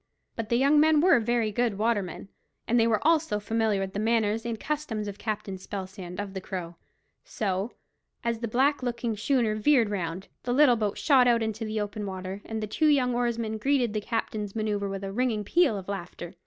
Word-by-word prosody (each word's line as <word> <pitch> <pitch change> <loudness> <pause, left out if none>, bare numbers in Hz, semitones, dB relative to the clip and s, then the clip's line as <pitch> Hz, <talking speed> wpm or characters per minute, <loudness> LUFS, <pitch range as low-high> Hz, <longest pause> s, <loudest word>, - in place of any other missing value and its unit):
But 230 -2 -4
the 235 - +2
young 280 +4 +4
men 310 0 +5
were 330 -4 +5
very 230 -1 0
good 230 -1 0
watermen, 205 -4 -1 0.4
and 240 +1 +3
they 225 - +4
were 220 +1 +1
also 320 -10 +2
familiar 220 -1 0
with 190 0 -3
the 205 - -2
manners 225 0 +1
and 230 -2 -3
customs 280 -9 -3
of 205 0 -7
Captain 205 -3 -4
Spelsand, 190 -2 -7
of 200 -1 -4
the 190 - -5
Crow; 175 -3 -6 0.5
so, 195 +1 -2 0.5
as 235 -1 -1
the 235 - -2
black 265 +6 +2
looking 240 -2 -2
schooner 225 0 +1
veered 225 0 +3
round, 180 -1 -3
the 245 0 -1
little 275 -3 +6
boat 210 -3 -1
shot 265 -4 +4
out 235 -2 +3
into 220 +1 -3
the 215 0 -2
open 210 0 -4
water, 190 +1 -5
and 220 -1 -4
the - - 0
two 310 +9 +1
young 260 -4 +3
oarsmen 230 -2 -1
greeted 255 -3 +1
the 215 - -1
captain's 210 -2 -3
manoeuvre 210 -2 -1
with 195 0 -5
a 195 - -4
ringing 235 -2 0
peal 280 - +3
of 190 - -8
laughter. 180 -2 -6
220 Hz, 205 wpm, -27 LUFS, 200-240 Hz, 0.5 s, little